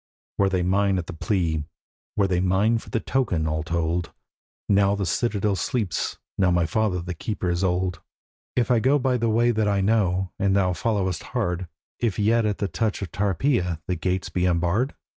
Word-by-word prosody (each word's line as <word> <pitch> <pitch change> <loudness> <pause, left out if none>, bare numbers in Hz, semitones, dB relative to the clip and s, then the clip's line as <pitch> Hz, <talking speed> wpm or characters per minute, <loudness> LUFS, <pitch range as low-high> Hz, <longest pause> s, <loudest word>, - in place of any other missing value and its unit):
'Were 100 -1 +4
they 95 -2 0
mine 95 +1 +2
at 90 - -3
the 90 - -7
plea, 80 -4 0 0.5
were 100 - +4
they 90 -2 +1
mine 95 +5 +2
for - - -13
the 115 - 0
token, 110 -12 0
all 80 0 -1
told, 85 +1 -1 0.6
Now 100 0 +3
the 100 -1 -2
citadel 105 0 0
sleeps, 100 - -2 0.2
now 95 -2 +4
my 85 -1 +2
father 90 +1 0
the 90 +1 -4
keeper 90 +1 -3
is 85 +2 -1
old, 90 0 0 0.5
'If 125 0 +1
I 120 - +4
go 135 +5 +3
by 130 -2 +1
the 115 -1 0
way 120 +2 +3
that 110 -2 0
I 100 -1 +2
know, 95 -3 +1
and 100 -1 +2
thou 95 -2 +2
followest 95 -5 -1 0.2
hard, 90 +1 -1 0.3
If 115 -5 0
yet 110 +1 +3
at 105 - -1
the 100 - -1
touch 105 +3 -1
of 95 - -6
Tarpeia 100 - 0
the 90 - 0
gates 90 +2 -2
be 90 0 0
unbarred? 90 - +1
95 Hz, 195 wpm, -24 LUFS, 90-110 Hz, 0.6 s, Were